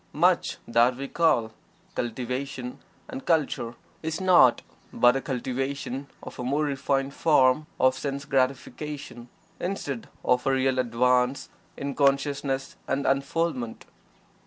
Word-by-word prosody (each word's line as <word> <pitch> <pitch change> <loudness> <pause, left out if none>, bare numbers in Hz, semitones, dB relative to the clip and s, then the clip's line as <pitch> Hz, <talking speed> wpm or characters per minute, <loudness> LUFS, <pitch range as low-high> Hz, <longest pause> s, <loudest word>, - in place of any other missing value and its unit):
Much - - +2
that 120 +2 +4
we 140 +1 -4
call 145 -10 +2 0.4
"cultivation" 125 +2 -4 0.3
and 265 0 -7
"culture" 145 -7 +1 0.3
is 160 0 -3
naught 175 -10 +5 0.3
but 120 +1 +4
a 135 - 0
cultivation 135 +1 -3 0.2
of - - -9
a - - -3
more 140 +5 +1
refined 140 -1 -1
form 150 -2 +3
of 130 0 +5
sense 140 0 -4
gratification, 135 -1 -2 0.3
instead 145 -9 -4 0.2
of 125 +1 +2
a - - +4
real 130 -1 +2
advance 125 +2 +2 0.3
in 140 0 -3
consciousness 140 -1 0
and 140 - -1
unfoldment. 140 -3 -1
135 Hz, 120 wpm, -26 LUFS, 125-145 Hz, 0.4 s, naught